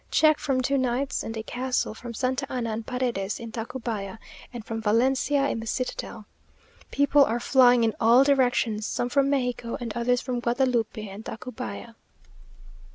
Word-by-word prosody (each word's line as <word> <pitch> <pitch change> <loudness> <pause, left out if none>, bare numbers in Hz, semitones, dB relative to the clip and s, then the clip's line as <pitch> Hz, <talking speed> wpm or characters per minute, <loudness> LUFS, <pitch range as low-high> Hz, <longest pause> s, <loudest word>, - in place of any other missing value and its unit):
Check 310 -1 +4
from 265 -2 0
two 275 +2 +1
knights 260 +2 -1
and 225 0 -5
a 220 - -4
castle 250 -1 -2
from 235 +1 -8
Santa 260 +3 -2
Anna 240 -3 -2
and 220 +1 -5
Paredes 240 -6 -2
in 230 -1 -7
Tacubaya, 225 -3 -5 0.3
and 240 -3 -8
from 225 0 -4
Valencia 265 +6 +2
in 230 - -2
the 225 - -7
citadel. 235 -3 -4 0.6
People 285 0 +4
are 235 -2 0
flying 245 -1 +5
in 225 -1 +2
all 235 +4 +6
directions, 245 -6 +2
some 245 - -2
from 275 +1 +2
Mexico, 245 -4 -1
and 230 -3 -5
others 245 +1 +1
from 250 -1 -3
Guadalupe 240 -1 0
and 200 +2 -9
Tacubaya.... 245 0 -7
245 Hz, 160 wpm, -26 LUFS, 225-260 Hz, 0.6 s, all